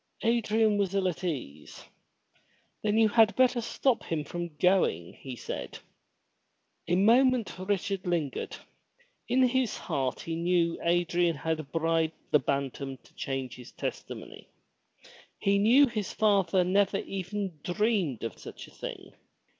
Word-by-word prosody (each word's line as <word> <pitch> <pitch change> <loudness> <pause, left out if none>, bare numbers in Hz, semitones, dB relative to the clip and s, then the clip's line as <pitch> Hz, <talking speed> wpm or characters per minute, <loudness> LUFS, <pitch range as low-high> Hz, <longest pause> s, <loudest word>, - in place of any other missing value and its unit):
Adrian 220 -2 +2
was 200 -1 0
ill 195 -1 +2
at 180 +1 -3
ease. 125 - -5 1.0
Then 210 0 +1
you 225 -1 +6
had 220 0 +4
better 255 -1 +3
stop 235 +2 0
him 160 -2 -3
from 170 +1 -6
going," 180 - +2
he 130 -2 -8
said. - - -6 1.1
A 175 - +2
moment 235 +4 +4
Richard 195 0 -2
lingered. 165 -6 -2 0.7
In 255 +2 +3
his 255 -2 0
heart 130 -2 -2
he 165 - -4
knew 170 0 +1
that - - -5
Adrian 175 0 +2
had 155 0 -3
bribed 165 -1 +1 0.2
the 150 - +6
Bantam 135 0 -3
to - - -24
change 135 -2 -4
his 125 - -11
testimony. - - -6 0.9
He 200 0 +2
knew 240 +8 +6
his 220 -6 -3
father 195 -4 +3
never 195 +2 +2
even 195 -3 -4
dreamed 185 - 0
of 115 -3 -5
such - - -10
a - - -17
thing. - - -8
180 Hz, 140 wpm, -29 LUFS, 160-215 Hz, 1.1 s, you